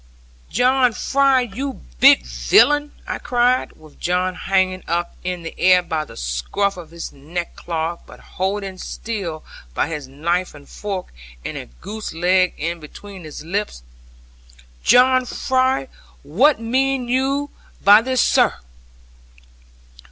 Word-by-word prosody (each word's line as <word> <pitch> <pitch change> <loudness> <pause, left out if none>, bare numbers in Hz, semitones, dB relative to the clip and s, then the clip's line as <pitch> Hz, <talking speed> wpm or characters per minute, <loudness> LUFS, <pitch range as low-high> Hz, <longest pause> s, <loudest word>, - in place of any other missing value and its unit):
'John 250 - +3
Fry, 275 +2 +3
you 255 +4 -5 0.2
big - - +7
villain!' 70 - +3
I - - -4
cried, 245 +1 +1
with 155 -2 -18
John 180 +1 0
hanging 185 0 0
up 170 +1 -2
in 180 -1 -3
the 165 - -6
air 180 0 +5
by 155 -3 -2
the - - -13
scruff - - -1
of 175 -3 -10
his 170 0 -8
neck 165 +5 -6
cloth, 165 0 -3
but - - -14
holding 190 0 -4
still 190 -10 -5 0.3
by - - 0
his 150 -4 -5
knife 170 +6 -2
and 145 -1 -14
fork, 195 -3 -6 0.3
and - - -4
a - - -6
goose 205 - -8
leg 180 +2 +2
in 170 +3 -3
between 185 +4 -11
his 155 - -8
lips, 195 - -3 1.0
'John 255 +1 +5
Fry, 260 - 0 0.4
what 230 - +3
mean 260 +2 0
you 275 +3 0 0.3
by 205 +2 +8
this, 255 +1 +1
sir?' - - +3
185 Hz, 135 wpm, -20 LUFS, 165-245 Hz, 1.0 s, by